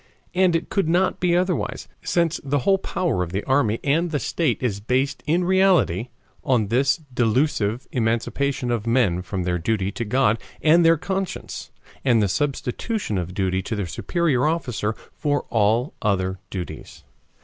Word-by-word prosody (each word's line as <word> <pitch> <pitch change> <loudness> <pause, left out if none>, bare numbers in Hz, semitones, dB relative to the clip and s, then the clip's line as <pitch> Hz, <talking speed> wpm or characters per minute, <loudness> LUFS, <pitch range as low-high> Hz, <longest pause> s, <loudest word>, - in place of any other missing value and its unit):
And 180 -1 +3
it 165 - -1
could 195 -6 0
not 180 +3 +2
be 175 -1 +2
otherwise, 180 0 -1
since 170 -2 0
the 140 0 0
whole 195 -1 +4
power 170 - -1
of 85 -2 -3
the 95 +3 -2
army 125 -5 +2
and 160 +5 +2
the 155 - -1
state 140 -5 -1
is 105 -5 0
based 130 +6 0
in 170 +4 +2
reality 180 - +3 0.4
on 115 -6 +1
this 130 +4 +3 0.2
delusive 120 -1 +1
emancipation 120 +2 0
of 115 -1 -2
men 115 -8 +2
from 95 0 -4
their 90 0 -1
duty 100 +1 0
to 120 - -4
God 115 0 +2 0.2
and 165 +2 +6
their 165 0 +5
conscience, 190 +3 -4 0.3
and 120 -4 +4
the 105 - +3
substitution 140 - -2
of 90 +1 -5
duty 95 -1 0
to 110 - -4
their 100 -2 -2
superior 150 - 0
officer 125 -9 -1 0.2
for 145 -2 -1
all 115 +4 +2
other 95 -2 0
duties. 90 -3 -7
125 Hz, 160 wpm, -23 LUFS, 105-165 Hz, 0.4 s, and